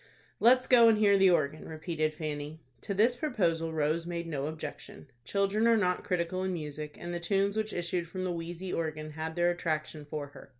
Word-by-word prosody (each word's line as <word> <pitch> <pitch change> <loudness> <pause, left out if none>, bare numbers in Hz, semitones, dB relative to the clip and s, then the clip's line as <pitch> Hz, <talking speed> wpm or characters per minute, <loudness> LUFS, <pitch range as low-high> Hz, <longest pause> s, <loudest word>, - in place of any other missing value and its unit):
"Let's 255 +2 +5
go 235 -2 +7
and 220 - +4
hear 205 -2 +5
the 195 -1 +6
organ," 155 -3 0
repeated 155 -1 -2
Fanny. 150 0 -5 0.2
To 200 - -3
this 230 +5 +4
proposal 175 - 0
Rose 160 +2 0
made 170 -1 -3
no 145 -4 -3
objection. 155 -2 -7 0.2
Children 200 - +1
are 230 -1 +5
not 180 -3 +1
critical 180 0 -1
in 190 0 -1
music, 150 -2 -6
and 175 0 -5
the 175 - -2
tunes 195 +3 +1
which 215 0 -1
issued 175 0 -2
from 185 +2 -5
the 185 - -1
wheezy 175 +2 -5
organ 155 -1 -3
had 160 +1 -5
their 175 0 +3
attraction 155 -3 -3
for 150 0 -4
her. 145 - -14
170 Hz, 200 wpm, -30 LUFS, 155-195 Hz, 0.2 s, go